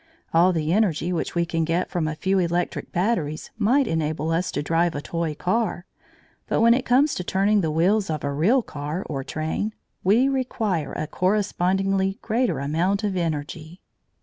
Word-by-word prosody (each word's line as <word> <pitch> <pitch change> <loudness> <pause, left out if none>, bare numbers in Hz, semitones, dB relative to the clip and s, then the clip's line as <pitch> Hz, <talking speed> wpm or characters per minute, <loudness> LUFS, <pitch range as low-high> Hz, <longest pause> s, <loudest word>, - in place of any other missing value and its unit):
All 170 +3 +5
the 160 -1 0
energy 180 -4 +1
which 170 - -3
we 170 0 +2
can 165 -1 -1
get 170 +3 -1
from 170 -4 -1
a 155 - -3
few 190 +4 +1
electric 175 0 -1
batteries 175 -6 -1
might 265 +6 +3
enable 160 -3 -1
us 175 +3 0
to 145 - -2
drive 165 +1 +1
a - - -2
toy 165 -1 -3
car, 185 +1 -1 0.6
but - - 0
when 230 +1 +6
it 250 +1 -1
comes 275 +5 +4
to 180 - -3
turning 200 +3 +2
the 160 - 0
wheels 185 +6 +2
of 155 -2 -3
a 140 0 -1
real 215 - +3
car 150 +3 -5
or 135 -3 -4
train, 160 +9 -3 0.3
we 225 +8 +4
require 220 - -1
a 155 - -3
correspondingly 195 +2 0
greater 235 - 0
amount 170 +9 0
of 200 -2 -1
energy. 160 0 -4
175 Hz, 175 wpm, -24 LUFS, 160-205 Hz, 0.6 s, when